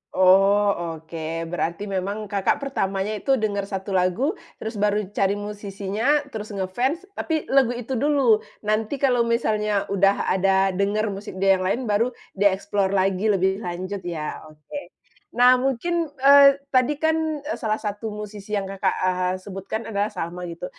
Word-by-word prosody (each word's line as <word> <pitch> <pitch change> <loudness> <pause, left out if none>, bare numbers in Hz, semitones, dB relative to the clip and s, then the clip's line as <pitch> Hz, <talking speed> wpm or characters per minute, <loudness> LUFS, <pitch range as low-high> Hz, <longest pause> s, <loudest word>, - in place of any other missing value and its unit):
Oh 195 -2 +4
oke, 165 0 -5
berarti 175 +2 -2
memang 200 +2 -3
Kakak 200 +7 0
pertamanya 195 -7 -1
itu 270 +4 +2
dengar 205 -4 -1
1 195 0 -5
lagu, 190 - +1 0.2
terus 220 -1 -6
baru 210 +1 +2
cari 200 -1 +1
musisinya, 205 +6 -1
terus 215 -2 -6
ngefans, 245 - -1
tapi 320 -5 -2
lagu 265 -3 +4
itu 245 +1 -7
dulu, 275 -6 +3 0.2
nanti 215 +4 0
kalau 245 -3 +3
misalnya 215 -3 +1
udah 200 0 +2
ada 195 +1 +3
dengar 205 +3 0
musik 200 0 -7
dia 195 0 +3
yang - - -2
lain 230 +7 0
baru 210 +4 +2 0.3
di-explore 200 0 +1
lagi 190 +2 +1
lebih 190 -1 +2
lanjut 185 +1 -4
ya, 155 -2 -5
oke. 155 - -10 0.4
Nah 250 +1 +6
mungkin, 315 +7 0 0.2
eee, 280 0 +8 0.2
tadi 255 +3 +3
kan, 315 -1 0
eee, 300 - -4
salah 215 -3 0
satu 210 +1 -4
musisi 210 0 -6
yang 200 - -1
Kakak, 195 0 -1
eee, 185 0 +1
sebutkan 195 +3 -5
adalah 205 -1 -1
sama 180 -2 -5
gitu, 170 +1 -6
205 Hz, 155 wpm, -23 LUFS, 190-235 Hz, 0.4 s, eee